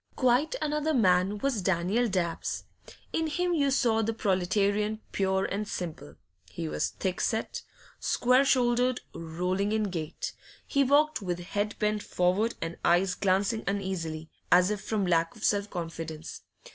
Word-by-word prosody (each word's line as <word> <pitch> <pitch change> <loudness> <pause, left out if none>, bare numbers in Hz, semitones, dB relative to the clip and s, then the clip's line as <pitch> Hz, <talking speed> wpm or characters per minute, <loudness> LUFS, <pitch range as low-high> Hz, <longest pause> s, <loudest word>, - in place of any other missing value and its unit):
Quite 255 - +2
another 300 +1 0
man 190 -2 +3
was 240 -1 -1
Daniel 190 +6 +1
Dabbs: 180 -5 -2 0.5
in 325 -1 0
him 355 +4 0
you 285 -4 +2
saw 235 -4 +2
the 225 +1 0
proletarian 205 +2 +1
pure 190 0 +1
and 205 +1 -3
simple. 160 - -6 0.3
He 85 -2 -5
was 75 0 -1
thick 185 -2 -3
set, 225 -1 -1 0.4
square 250 +2 +3
shouldered, 250 -1 +2
rolling 180 +5 -2
in 215 -3 0
gait; 160 -4 -4 0.3
he 280 - +2
walked 290 +1 +3
with 180 -2 -2
head 205 +4 -2
bent 210 -1 0
forward 190 +7 +1
and 165 +1 -5
eyes 180 +2 +3
glancing 200 +4 +1
uneasily, 180 -6 -3 0.2
as 180 +2 +6
if 210 -2 -2
from 210 -1 -1
lack 165 -2 +1
of 220 - -12
self 205 0 +1
confidence. 165 -2 -6
200 Hz, 145 wpm, -28 LUFS, 180-235 Hz, 0.5 s, as